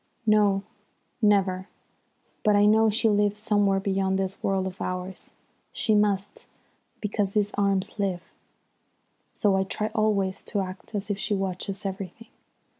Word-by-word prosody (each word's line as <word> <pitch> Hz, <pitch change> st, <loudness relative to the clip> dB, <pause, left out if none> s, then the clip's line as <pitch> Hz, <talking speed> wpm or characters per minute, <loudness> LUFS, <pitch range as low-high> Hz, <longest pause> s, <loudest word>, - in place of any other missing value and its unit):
"No, 205 Hz, -2 st, +3 dB, 0.6 s
never. 195 Hz, -3 st, +2 dB, 0.7 s
But 210 Hz, -2 st, +3 dB
I 205 Hz, 0 st, +5 dB
know 220 Hz, +1 st, +5 dB
she 225 Hz, +2 st, +2 dB
lives 210 Hz, -1 st, +2 dB
somewhere 205 Hz, -3 st, +2 dB
beyond 190 Hz, -1 st, 0 dB
this 195 Hz, 0 st, -3 dB
world 195 Hz, -1 st, 0 dB
of 190 Hz, 0 st, -6 dB
ours. 185 Hz, +1 st, -5 dB, 0.4 s
She 230 Hz, -3 st, +1 dB
must, 205 Hz, -1 st, 0 dB, 0.5 s
because 205 Hz, -2 st, -1 dB
these 205 Hz, -1 st, +1 dB
arms 200 Hz, +1 st, 0 dB
live. 185 Hz, -3 st, -1 dB, 1.1 s
So 205 Hz, -3 st, +2 dB
I 190 Hz, -, +2 dB
try 210 Hz, +3 st, -2 dB
always 200 Hz, -4 st, +1 dB
to 205 Hz, -, -1 dB
act 185 Hz, +3 st, -7 dB
as 205 Hz, +1 st, -2 dB
if 200 Hz, -, -3 dB
she 210 Hz, -, 0 dB
watches 195 Hz, +1 st, -3 dB
everything. 195 Hz, +3 st, -6 dB
200 Hz, 140 wpm, -26 LUFS, 190-210 Hz, 1.1 s, I